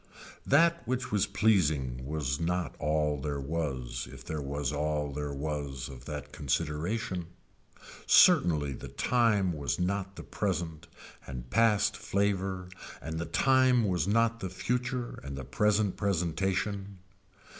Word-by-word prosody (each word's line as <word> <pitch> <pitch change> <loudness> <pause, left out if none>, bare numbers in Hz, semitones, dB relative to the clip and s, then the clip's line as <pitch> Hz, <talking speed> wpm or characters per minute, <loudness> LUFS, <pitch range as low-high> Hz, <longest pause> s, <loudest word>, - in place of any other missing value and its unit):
That 170 +4 +4
which 130 0 -2
was 105 -2 +2
pleasing 75 - +1
was 70 -2 -2
not 85 -4 -1
all 75 -1 0
there 70 0 -2
was 65 -5 -3
if - - -11
there 80 -1 -3
was 70 0 -2
all 75 0 -1
there 75 +1 -4
was 70 -2 -4
of 65 -3 -11
that 75 0 -6
consideration. 80 - -2 0.8
Certainly 75 -5 +5
the - - -8
time 110 -7 +2
was 70 -4 -2
not 95 +2 -1
the - - -8
present 85 -6 -3 0.4
and 60 -2 -7
past 110 -3 +3
flavor 95 -2 -1 0.3
and 80 +2 -5
the 85 - -3
time 130 +5 +4
was 90 -4 0
not 115 +2 +2
the 95 - -4
future 125 +5 -2
and 70 0 -6
the 65 - -6
present 105 -2 +1
presentation. 95 +2 -1
85 Hz, 135 wpm, -30 LUFS, 75-100 Hz, 0.8 s, Certainly